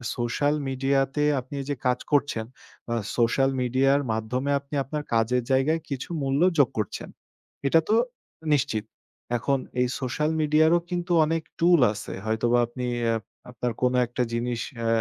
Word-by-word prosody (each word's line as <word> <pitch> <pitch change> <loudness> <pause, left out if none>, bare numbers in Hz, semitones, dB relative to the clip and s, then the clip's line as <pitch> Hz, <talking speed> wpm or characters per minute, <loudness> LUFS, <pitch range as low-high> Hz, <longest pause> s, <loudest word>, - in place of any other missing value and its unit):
Social 135 +5 0
মিডিয়াতে 135 +2 +1 0.2
আপনি 130 +3 -8
যে 145 - 0
কাজ 125 0 +2
করছেন, 140 -6 +1 0.4
বা 115 - -1 0.2
সোশ্যাল 125 +3 +3
মিডিয়ার 135 +3 +3
মাধ্যমে 125 +6 -1
আপনি 140 +1 -8
আপনার 150 +3 -4
কাজের 115 +2 +2
জায়গায় 145 +5 +3
কিছু 135 +2 -4
মূল্য 135 +3 +1 0.2
যোগ 140 -5 +5
করছেন। 105 - -3 0.6
এটা 165 +4 +5
তো 215 - +4 0.6
নিশ্চিত। 110 -6 0 0.5
এখন 140 +4 +1 0.2
এই 125 - +3
সোশ্যাল 150 +4 -1
মিডিয়ারও 155 +3 +4
কিন্তু 175 0 -3
অনেক 160 +1 -1 0.2
টুল 170 -1 +5
আছে। 100 -1 -7
হয়তোবা 115 +2 +2
আপনি 125 +1 -5 0.3
আপ 110 - -4 0.3
আপনার 125 0 -2
কোনো 125 0 +2
একটা 125 +1 -1
জিনিস 120 0 -1 0.3
আ - - +1
130 Hz, 150 wpm, -26 LUFS, 120-145 Hz, 0.6 s, যোগ